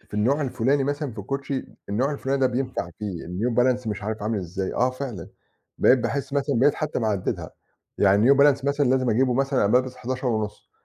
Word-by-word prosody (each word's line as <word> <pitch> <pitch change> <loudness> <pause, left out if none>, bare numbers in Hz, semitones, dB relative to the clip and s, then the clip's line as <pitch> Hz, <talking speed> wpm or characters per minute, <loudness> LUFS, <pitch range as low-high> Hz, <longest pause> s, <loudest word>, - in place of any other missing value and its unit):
ف - - -28
في - - -12
النوع 130 +8 +2
الفُلاني 135 +1 +1
مثلًا 145 -2 -2
في 110 - -12
الكوتشي، 135 +5 -3 0.2
النوع 130 +8 0
الفُلاني 140 -1 -1
ده 130 - +5
بينفَع 125 +1 -3
فيه 100 -5 -5
الNew 110 +7 -2
Balance، 125 0 +2
مش 105 -1 -4
عارِف 110 0 -4
عامل 105 0 -1
إزاي. 95 +1 -4
آه 125 +1 +2
فعلًا، 130 -9 -6 0.5
بقيت 130 - +5
باحس 135 +4 -3
مثلًا 140 -2 0
بقيت 145 +2 +4
حتى 155 -1 -2
محدّدها، 105 -5 -2 0.5
يعني 100 +6 +4
New - - +8
Balance 140 -1 +4
مثلًا 140 0 +1
لازِم 130 -2 +2
أجيبه 125 +2 +2
مثلًا، 135 0 +1
أنا 100 - +2
بالبَس 125 0 +2
11.5، 120 -4 -3
125 Hz, 200 wpm, -24 LUFS, 110-140 Hz, 0.5 s, New